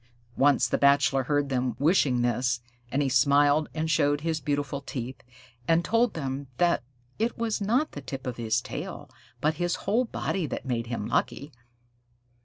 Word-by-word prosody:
Once 135 -3 +4
the - - 0
Bachelor 140 -2 +4
heard 145 0 +1
them 125 -3 -1
wishing 140 -5 +3
this, 120 0 0 0.3
and 145 +2 +1
he - - +1
smiled 145 +3 +4
and 160 0 -1
showed 145 0 +2
his 160 -1 -1
beautiful 140 0 -2
teeth, 130 -2 -6 0.5
and 165 +1 +3
told 230 +1 +2
them 135 -2 -4
that 175 -5 +3 0.4
it 230 +2 0
was 225 -3 -1
not 240 +9 +1
the 145 - -7
tip 135 -1 -7
of 125 -2 -4
his 115 0 0
tail - - -6 0.3
but 155 +2 +1
his 175 0 +1
whole 230 +6 +2
body 190 -6 -2
that - - -5
made 120 -3 -2
him 115 -3 -3
lucky. 145 +2 -1
145 Hz, 170 wpm, -27 LUFS, 130-160 Hz, 0.5 s, Once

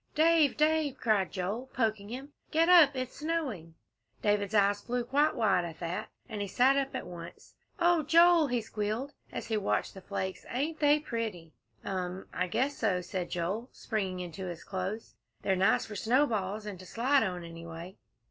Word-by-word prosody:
"Dave 315 -2 +4
Dave!" 305 -2 +2
cried 215 -6 +1
Joel, 210 +8 -3
poking 220 -4 0
him, 270 +5 -7 0.2
"get 325 +2 +3
up 320 -6 +8
it's 255 -1 -4
snowing!" 275 - -3 0.5
David's 205 0 +1
eyes 200 0 +3
flew 245 0 -2
quite 290 +5 +2
wide 205 -7 +3
at 165 -2 -6
that, 170 +1 -4 0.2
and 215 -4 -5
he 200 - -2
sat 255 +7 +4
up 275 -1 -1
at - - -4
once. 170 -1 -10 0.3
"Oh, 345 -1 +4
Joel," 335 +1 +6
he 245 -2 0
squealed, 220 +6 -3 0.2
as - - -5
he 220 - -1
watched 205 - 0
the 190 - -10
flakes, 190 0 -4
"ain't 300 +6 -2
they 295 0 +5
pretty!" 220 - -4 0.3
"Um! 185 0 -3
I 180 - 0
guess 260 +10 0
so," 190 -5 +1
said 180 0 -4
Joel, 195 +8 -2
springing 190 -5 -3
into 180 +2 -6
his 170 -1 -6
clothes; 195 +3 -4 0.3
"they're 190 - +2
nice 190 +3 +3
for 210 - -8
snowballs 215 -3 +1
and 200 -4 -6
to 185 - -11
slide 265 +4 +2
on, 180 -2 -2
anyway." 165 +2 -9
215 Hz, 175 wpm, -30 LUFS, 185-275 Hz, 0.5 s, up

